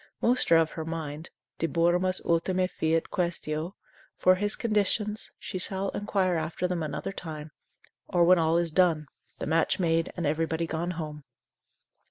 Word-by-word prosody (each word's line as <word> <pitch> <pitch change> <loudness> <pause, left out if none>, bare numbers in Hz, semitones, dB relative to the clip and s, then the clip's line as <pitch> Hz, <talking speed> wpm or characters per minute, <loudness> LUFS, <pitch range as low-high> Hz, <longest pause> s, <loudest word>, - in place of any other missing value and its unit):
Most 245 -4 +2
are 165 - +8
of 160 -1 +2
her 160 - -5
mind, 160 -1 -5 0.3
De 165 - +1
moribus 175 +3 +1
ultima 180 +2 +2
fiet 160 -2 0
questio, 170 -1 -2 0.4
for 185 - +5
his 205 +3 +1
conditions, 210 -1 0
she 185 - -5
shall 195 +1 -1
inquire 190 -4 0
after 160 +3 -2
them 180 -2 -2
another 155 +4 -3
time, 155 -4 -7 0.6
or 175 -3 +3
when 180 +1 +6
all 165 +1 +3
is 170 -1 +1
done, 165 -3 +3 0.3
the - - -4
match 160 +1 +2
made, 165 -2 +1
and 170 - -1
everybody 160 +2 0
gone 165 +2 -2
home. 150 -3 -5
170 Hz, 160 wpm, -28 LUFS, 160-185 Hz, 0.6 s, are